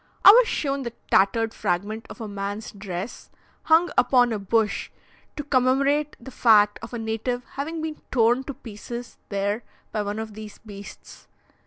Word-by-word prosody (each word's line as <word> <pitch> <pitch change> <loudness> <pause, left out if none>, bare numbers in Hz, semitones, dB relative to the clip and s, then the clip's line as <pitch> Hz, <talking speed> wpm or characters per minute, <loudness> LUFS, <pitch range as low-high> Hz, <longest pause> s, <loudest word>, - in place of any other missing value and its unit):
I - - +13
was 475 +2 +6
shown 275 -2 -1
the 235 -3 -5 0.2
tattered 225 +4 +3
fragment 210 +6 -2
of - - -10
a 225 - -5
man's 205 +1 -5
dress, 195 +1 -6 0.4
hung 330 +2 +4
upon 245 -2 +4
a 215 - -2
bush, 215 +1 0 0.5
to 295 - -4
commemorate 280 +2 +2
the 265 +2 -10
fact 210 -5 +4
of - - -7
a - - -2
native 225 +2 -2
having 315 +3 -4
been 315 -1 -5
torn 240 +1 +3
to 280 - -6
pieces 235 +2 -8
there 200 +2 -1 0.3
by 215 - -1
one 205 +1 -3
of 220 -1 -5
these 215 0 -9
beasts. 200 -2 -12
225 Hz, 165 wpm, -24 LUFS, 205-265 Hz, 0.5 s, I